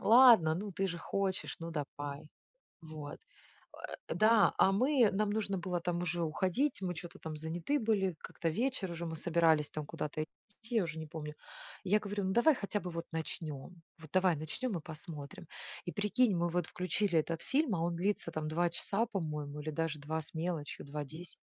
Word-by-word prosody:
ладно, 225 Hz, -9 st, +8 dB
ну, 205 Hz, +1 st, -4 dB
ты 195 Hz, +2 st, 0 dB
же 170 Hz, -1 st, -4 dB
хочешь, 195 Hz, +2 st, -1 dB
ну, 165 Hz, 0 st, -4 dB
давай". 145 Hz, -1 st, -5 dB, 0.5 s
Вот. 155 Hz, -2 st, -7 dB, 0.7 s
Э, -, -, -7 dB, 0.2 s
да, 215 Hz, -1 st, +6 dB
а 190 Hz, -, +6 dB
мы 250 Hz, +2 st, +4 dB
нам 205 Hz, +1 st, +1 dB
нужно 205 Hz, -2 st, 0 dB
было 180 Hz, 0 st, -1 dB
там 175 Hz, 0 st, -1 dB
уже 175 Hz, -1 st, -1 dB
уходить, 190 Hz, -, +1 dB
мы 180 Hz, -1 st, -2 dB
чё-то 170 Hz, +1 st, -8 dB
там 160 Hz, -1 st, -5 dB
заняты 170 Hz, -, -1 dB
были, 200 Hz, -5 st, +1 dB
как-то 165 Hz, -, -3 dB
вечер 220 Hz, -1 st, 0 dB
уже, 170 Hz, 0 st, -4 dB
мы 160 Hz, -, -3 dB
собирались 160 Hz, -2 st, +3 dB
там 155 Hz, -1 st, -4 dB
куда-то 150 Hz, +1 st, -3 dB
идти, 220 Hz, +7 st, -9 dB
я 220 Hz, -, +5 dB
уже 160 Hz, -2 st, -4 dB
не 160 Hz, -, -4 dB
помню. 150 Hz, -1 st, -6 dB, 0.5 s
Я 205 Hz, +3 st, +4 dB
говорю: 205 Hz, -1 st, -3 dB
"Ну, 190 Hz, -, +1 dB
давай 265 Hz, +6 st, +6 dB
хотя 205 Hz, -1 st, -2 dB
бы 180 Hz, -, -5 dB
вот 165 Hz, 0 st, -4 dB
начнем. 160 Hz, 0 st, -4 dB, 0.2 s
Вот 160 Hz, -, -11 dB
давай 185 Hz, -2 st, +4 dB
начнем 170 Hz, -, -2 dB
и 160 Hz, -, -6 dB
посмотрим". 155 Hz, 0 st, -8 dB, 0.4 s
И 175 Hz, -, -3 dB
прикинь, 210 Hz, +1 st, +2 dB
мы 175 Hz, 0 st, +1 dB
вот 175 Hz, 0 st, 0 dB
включили 180 Hz, +1 st, +1 dB
этот 165 Hz, +1 st, -2 dB
фильм, 275 Hz, -6 st, +2 dB
а 165 Hz, -, -1 dB
он 170 Hz, 0 st, 0 dB
длится 180 Hz, -1 st, 0 dB
там 155 Hz, -1 st, -3 dB
2 170 Hz, +3 st, +2 dB
часа, 205 Hz, +6 st, 0 dB
по-моему, 150 Hz, -8 st, -3 dB
или 150 Hz, +1 st, -4 dB
даже 155 Hz, -1 st, -1 dB
2 155 Hz, +3 st, -2 dB
с 155 Hz, -, -13 dB
мелочью, 165 Hz, -2 st, -3 dB
2:10. 150 Hz, +4 st, -6 dB
175 Hz, 190 wpm, -34 LUFS, 155-200 Hz, 0.7 s, ладно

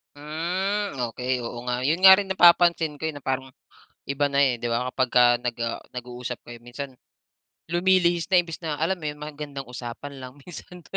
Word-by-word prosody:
Hmm, 180 Hz, +6 st, -2 dB, 0.2 s
okey 125 Hz, +3 st, -6 dB
oo 120 Hz, 0 st, -6 dB
nga. 125 Hz, -, 0 dB
'Yon 160 Hz, +5 st, +1 dB
nga 190 Hz, 0 st, +11 dB
rin 200 Hz, -1 st, -2 dB
napapansin 170 Hz, -3 st, +5 dB
ko, -, -, -9 dB
eh, -, -, -6 dB
na 145 Hz, -, -10 dB
parang 130 Hz, 0 st, -2 dB, 0.5 s
iba 140 Hz, +1 st, 0 dB
na, 140 Hz, 0 st, +1 dB
eh, 125 Hz, -3 st, +1 dB
di 120 Hz, -, -1 dB
ba 125 Hz, +2 st, -1 dB
kapagka, 120 Hz, -1 st, +3 dB
ah, 120 Hz, -1 st, -3 dB
nag-uusap 125 Hz, 0 st, -6 dB
kayo 120 Hz, -1 st, -10 dB
minsan, 130 Hz, +3 st, -8 dB, 0.8 s
lumilihis 175 Hz, -1 st, +2 dB
na 185 Hz, -, +5 dB
imbis 165 Hz, -2 st, -8 dB
na 160 Hz, -3 st, -3 dB
alam 170 Hz, +4 st, 0 dB
mo 155 Hz, -, -8 dB
'yon 150 Hz, 0 st, -5 dB
magandang 145 Hz, -3 st, -7 dB
usapan 125 Hz, +3 st, -8 dB
lang 125 Hz, 0 st, -9 dB
minsan 180 Hz, 0 st, -11 dB
145 Hz, 180 wpm, -25 LUFS, 125-170 Hz, 0.8 s, nga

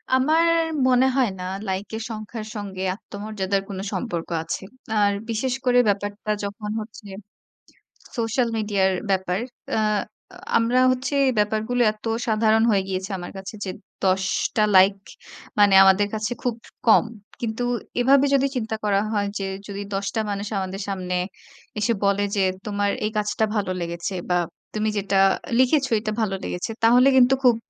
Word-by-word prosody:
আমার 310 Hz, +6 st, +3 dB, 0.4 s
মনে 255 Hz, 0 st, +4 dB
হয় 255 Hz, -5 st, +3 dB
না -, -, -5 dB, 0.2 s
লাইক 190 Hz, +2 st, -2 dB
এর 225 Hz, -, -4 dB
সংখ্যার 215 Hz, 0 st, -6 dB
সঙ্গে 195 Hz, -2 st, -5 dB
আত্মমর্যাদার 200 Hz, -2 st, -3 dB
কোনো 190 Hz, -1 st, -5 dB
সম্পর্ক 175 Hz, -9 st, -3 dB
আছে। 165 Hz, -, -4 dB, 0.4 s
আর 205 Hz, -1 st, +4 dB, 0.2 s
বিশেষ 235 Hz, +3 st, -1 dB
করে 245 Hz, -1 st, +5 dB
ব্যাপারটা 205 Hz, +1 st, -1 dB
যখন 205 Hz, +1 st, -5 dB
হচ্ছে 215 Hz, -1 st, -11 dB, 1.1 s
সোশ্যাল 235 Hz, +2 st, +1 dB
মিডিয়ার 200 Hz, -3 st, +1 dB, 0.2 s
ব্যাপার। 190 Hz, -1 st, 0 dB, 0.3 s
অ্যা 220 Hz, -, +1 dB, 0.5 s
আ -, -, -12 dB, 0.2 s
আমরা 235 Hz, +2 st, +2 dB
হচ্ছে 255 Hz, +2 st, -2 dB, 0.2 s
ব্যাপারগুলো 220 Hz, +4 st, +1 dB
এত 215 Hz, +1 st, -15 dB, 0.2 s
সাধারণ 220 Hz, 0 st, +3 dB
হয়ে 195 Hz, -2 st, +2 dB
গিয়েছে 190 Hz, 0 st, -3 dB
আমার 175 Hz, -, -7 dB
কাছে 190 Hz, +2 st, -7 dB
যে -, -, -4 dB, 0.3 s
১০ 190 Hz, 0 st, +2 dB, 0.3 s
টা 215 Hz, -, +3 dB
লাইক 190 Hz, +1 st, +7 dB, 0.6 s
মানে 205 Hz, -1 st, +6 dB
আমাদের 190 Hz, +1 st, +5 dB
কাছে 215 Hz, +2 st, -2 dB
খুব 245 Hz, -2 st, 0 dB, 0.3 s
কম। 225 Hz, -, +6 dB, 0.4 s
কিন্তু 230 Hz, +1 st, -2 dB, 0.4 s
এভাবে 270 Hz, +3 st, +5 dB
যদি 275 Hz, 0 st, +4 dB
চিন্তা 225 Hz, -3 st, -2 dB
করা 200 Hz, -1 st, +2 dB
হয় 205 Hz, -2 st, 0 dB
যে 195 Hz, -, -2 dB, 0.2 s
যদি 200 Hz, 0 st, -5 dB
১০ 195 Hz, +1 st, -1 dB
টা 220 Hz, -, +2 dB
মানুষ 200 Hz, +1 st, -3 dB
আমাদের 190 Hz, +1 st, -4 dB
সামনে 185 Hz, -2 st, -3 dB, 0.6 s
এসে 215 Hz, +3 st, +2 dB
বলে 200 Hz, 0 st, +2 dB
যে 200 Hz, -, +2 dB, 0.2 s
তোমার 205 Hz, -1 st, 0 dB, 0.2 s
এই 215 Hz, -, -1 dB
কাজটা 210 Hz, +1 st, 0 dB
ভালো 200 Hz, -3 st, 0 dB
লেগেছে 170 Hz, +2 st, -4 dB, 0.2 s
বা 180 Hz, -, +3 dB, 0.4 s
তুমি 215 Hz, 0 st, 0 dB
যেটা 200 Hz, -1 st, 0 dB, 0.4 s
লিখেছ 265 Hz, +2 st, +4 dB
এটা 215 Hz, 0 st, -3 dB
ভালো 200 Hz, -3 st, 0 dB
লেগেছে। 180 Hz, +5 st, -3 dB
তাহলে 245 Hz, +3 st, +6 dB
কিন্তু 255 Hz, +1 st, +6 dB
খুব 245 Hz, -2 st, +6 dB
210 Hz, 155 wpm, -23 LUFS, 195-230 Hz, 1.1 s, লাইক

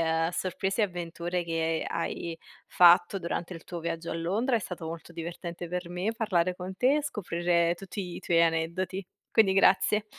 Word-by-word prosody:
uhm, 165 Hz, +1 st, +1 dB
sorprese 190 Hz, +4 st, -2 dB
e -, -, +5 dB
avventure 175 Hz, -1 st, -3 dB
che 165 Hz, -1 st, -1 dB
hai 170 Hz, -1 st, -3 dB, 0.3 s
fatto 175 Hz, +2 st, +6 dB
durante 170 Hz, 0 st, -3 dB
il 165 Hz, -, -8 dB
tuo 175 Hz, -2 st, -6 dB
viaggio 165 Hz, 0 st, -4 dB
a -, -, -3 dB
Londra. 210 Hz, +10 st, +1 dB
È -, -, +2 dB
stato 180 Hz, -3 st, -6 dB
molto 165 Hz, +1 st, -7 dB
divertente 170 Hz, +1 st, -6 dB
per 180 Hz, 0 st, -4 dB
me 185 Hz, +5 st, -1 dB
parlare 180 Hz, -5 st, +1 dB
con 185 Hz, +1 st, -6 dB
te 255 Hz, +3 st, +4 dB
e 300 Hz, -, 0 dB
scoprire 175 Hz, -8 st, +1 dB
tutti 195 Hz, +3 st, -7 dB
i -, -, -7 dB
tuoi 170 Hz, -1 st, +3 dB
aneddoti. 170 Hz, +3 st, -1 dB, 0.2 s
Quindi 210 Hz, -4 st, +4 dB
grazie. 195 Hz, +2 st, +4 dB
175 Hz, 175 wpm, -28 LUFS, 170-190 Hz, 0.3 s, fatto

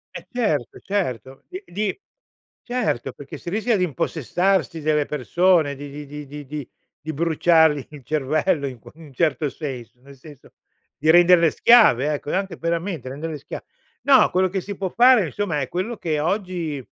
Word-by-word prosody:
Eh, -, -, -8 dB
certo, 155 Hz, -, -1 dB
certo. 135 Hz, -, -3 dB
Di 370 Hz, +2 st, -7 dB
di 210 Hz, -, -3 dB, 0.6 s
certo, 240 Hz, -, -2 dB
perché 140 Hz, +1 st, -10 dB
si 170 Hz, -, -7 dB
rischia 220 Hz, +3 st, +1 dB
di 180 Hz, -, +1 dB
impossessarsi 165 Hz, +2 st, -1 dB
delle 150 Hz, -1 st, +1 dB
persone 155 Hz, +2 st, +2 dB
di 145 Hz, +1 st, -8 dB
di 145 Hz, +1 st, -8 dB
di 150 Hz, +1 st, -8 dB
di 145 Hz, +1 st, -9 dB
di 145 Hz, -1 st, -7 dB, 0.3 s
di 155 Hz, +1 st, -6 dB
bruciargli 160 Hz, -2 st, +3 dB
il 145 Hz, -3 st, -12 dB
cervello 155 Hz, +2 st, 0 dB
in 130 Hz, -3 st, -8 dB
qu -, -, -14 dB
un 155 Hz, -4 st, -14 dB
certo 150 Hz, 0 st, 0 dB
senso. 125 Hz, -5 st, -7 dB
Nel 140 Hz, +1 st, -15 dB
senso 145 Hz, 0 st, -15 dB, 0.5 s
di 155 Hz, +2 st, 0 dB
renderle 175 Hz, -1 st, +6 dB
schiave, 155 Hz, -, +5 dB
ecco, 145 Hz, 0 st, -4 dB
anche, 190 Hz, -3 st, -2 dB
veramente, 170 Hz, -3 st, -3 dB
renderle 150 Hz, +4 st, -5 dB
schia 140 Hz, -, -8 dB, 0.4 s
no, 275 Hz, -2 st, +5 dB
quello 185 Hz, 0 st, +2 dB
che 190 Hz, 0 st, -2 dB
si 200 Hz, +2 st, -7 dB
può 190 Hz, 0 st, -3 dB
fare, 245 Hz, -1 st, +5 dB
insomma, 165 Hz, -2 st, -2 dB
è 130 Hz, -, -3 dB
quello 200 Hz, +6 st, -3 dB
che 155 Hz, -3 st, -2 dB
oggi, 170 Hz, -, -2 dB
160 Hz, 170 wpm, -22 LUFS, 145-185 Hz, 0.6 s, renderle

